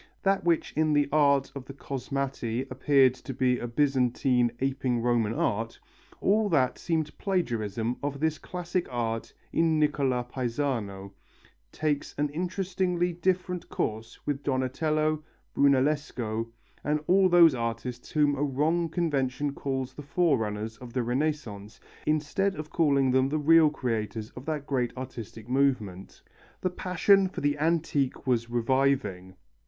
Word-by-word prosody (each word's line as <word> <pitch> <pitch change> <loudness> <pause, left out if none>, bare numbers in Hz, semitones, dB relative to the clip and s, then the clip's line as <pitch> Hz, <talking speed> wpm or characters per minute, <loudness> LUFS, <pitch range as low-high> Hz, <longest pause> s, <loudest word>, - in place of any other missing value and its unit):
That 195 0 +2
which 170 -1 +1
in 155 0 +2
the 145 -1 +3
art 140 -2 +3
of 140 -2 -7
the 140 - -10
Cosmati 135 -3 -3
appeared 130 0 +4
to 130 0 -8
be 125 -1 +2
a 120 - -4
Byzantine 125 -2 +2
aping 130 -2 0
Roman 120 -3 +2
art, 115 +2 -1 0.4
all 210 +1 +2
that 135 -7 +2
seemed 160 -3 -1
plagiarism 120 - -1
of 140 -1 -3
this 155 0 0
classic 180 0 -3
art 115 -2 -3 0.2
in 165 -1 +3
Nicola 140 -5 +1
Pisano, 120 -6 -3 0.6
takes 150 -2 -2
an 145 0 +1
interestingly 180 +1 -1
different 180 +1 -1
course 110 +1 -3
with 145 -1 -2
Donatello, 155 +3 0 0.3
Brunellesco, 135 -5 +1 0.4
and 150 +1 +1
all 190 +3 +4
of 185 - +3
those 170 -3 +7
artists 120 +1 -4
whom 150 -2 +3
a 140 - -3
wrong 155 +5 +1
convention 145 -4 -1
calls 135 -2 -3
the - - -8
forerunners 115 -9 0
of 125 -2 -11
the 125 - 0
Renaissance 120 -5 -3 0.3
instead 155 +6 +1
of 155 0 -7
calling 140 -5 +3
them 130 +1 +3
the 155 - 0
real 160 +1 +6
creators 115 -6 -3
of 125 - -10
that 150 -3 -2
great 125 -3 -1
artistic 120 -4 -8
movement. 125 -8 -1 0.4
The 185 - 0
passion 190 +2 +3
for - - -6
the 145 0 0
antique 150 -4 0
was 120 -3 +1
reviving. 120 -6 0
140 Hz, 140 wpm, -28 LUFS, 125-155 Hz, 0.6 s, those